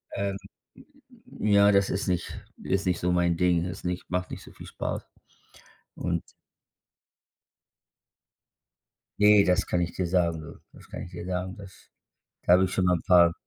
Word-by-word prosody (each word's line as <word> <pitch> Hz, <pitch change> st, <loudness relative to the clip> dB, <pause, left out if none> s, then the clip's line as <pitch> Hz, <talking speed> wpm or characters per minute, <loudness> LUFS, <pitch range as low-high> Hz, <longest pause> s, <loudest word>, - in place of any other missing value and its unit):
ähm 100 Hz, -1 st, -2 dB, 1.0 s
ja, 100 Hz, -1 st, +5 dB
das 100 Hz, -1 st, +3 dB
ist 95 Hz, +3 st, -2 dB
nicht 90 Hz, -2 st, -3 dB, 0.2 s
ist 95 Hz, +1 st, -1 dB
nicht 90 Hz, -1 st, +1 dB
so 90 Hz, -, 0 dB
mein 85 Hz, -1 st, +2 dB
Ding. 90 Hz, -1 st, +2 dB
Ist 90 Hz, +1 st, -7 dB
nicht 90 Hz, 0 st, -4 dB
macht 90 Hz, 0 st, -2 dB
nicht -, -, -7 dB
so -, -, -14 dB
viel -, -, -12 dB
Spaß. -, -, -5 dB, 0.9 s
Und 85 Hz, -1 st, -2 dB, 3.0 s
Ne, 105 Hz, -1 st, +7 dB
das 90 Hz, 0 st, +1 dB
kann 90 Hz, -, 0 dB
ich 85 Hz, -1 st, -2 dB
dir 90 Hz, -, -2 dB
sagen, 85 Hz, -2 st, +1 dB
du. 80 Hz, -, -11 dB
Das -, -, -16 dB
kann -, -, -7 dB
ich 85 Hz, -, -10 dB
dir -, -, -7 dB
sagen, 90 Hz, 0 st, -3 dB
das 100 Hz, -2 st, -14 dB, 0.6 s
da -, -, +4 dB
habe 95 Hz, +1 st, +5 dB
ich 95 Hz, -, -3 dB
schon 95 Hz, -, +1 dB
mal 90 Hz, 0 st, +3 dB
'n 80 Hz, -, -8 dB
paar 85 Hz, -2 st, +6 dB
90 Hz, 170 wpm, -27 LUFS, 85-95 Hz, 3.0 s, Ne